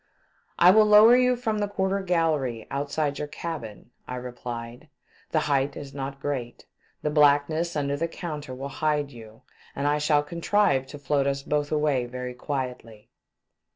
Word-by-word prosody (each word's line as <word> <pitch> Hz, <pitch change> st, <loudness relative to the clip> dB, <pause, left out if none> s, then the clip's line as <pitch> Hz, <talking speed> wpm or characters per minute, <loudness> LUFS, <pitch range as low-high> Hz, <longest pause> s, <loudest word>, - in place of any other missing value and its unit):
" -, -, -39 dB
I 175 Hz, +1 st, +7 dB
will 215 Hz, +2 st, +6 dB
lower 210 Hz, +3 st, +8 dB
you 250 Hz, 0 st, +3 dB
from 225 Hz, -3 st, -2 dB
the 205 Hz, -, 0 dB
quarter 195 Hz, 0 st, -1 dB
gallery 155 Hz, -, 0 dB
outside 145 Hz, +1 st, -2 dB
your 150 Hz, -, -3 dB
cabin," 125 Hz, -9 st, -7 dB, 0.2 s
I 125 Hz, -, -5 dB
replied, 120 Hz, +1 st, -7 dB, 0.4 s
"the 155 Hz, -, +1 dB
height 140 Hz, -1 st, 0 dB
is 140 Hz, -1 st, -8 dB
not 135 Hz, 0 st, -5 dB
great. 135 Hz, -4 st, -4 dB, 0.4 s
The 150 Hz, -, 0 dB
blackness 150 Hz, +3 st, +3 dB
under 140 Hz, -1 st, 0 dB
the 165 Hz, +4 st, -1 dB
counter 150 Hz, -6 st, -6 dB
will 135 Hz, +2 st, -6 dB
hide 150 Hz, -2 st, +1 dB
you, 110 Hz, -2 st, -13 dB, 0.3 s
and 140 Hz, -, -2 dB
I 150 Hz, +1 st, +2 dB
shall 150 Hz, 0 st, +2 dB
contrive 170 Hz, -3 st, +1 dB
to 145 Hz, -, -9 dB
float 140 Hz, -1 st, 0 dB
us 140 Hz, 0 st, -1 dB
both 145 Hz, 0 st, -1 dB
away 150 Hz, -5 st, +1 dB
very 125 Hz, 0 st, -6 dB
quietly." 125 Hz, -5 st, -6 dB
145 Hz, 165 wpm, -26 LUFS, 130-165 Hz, 0.4 s, lower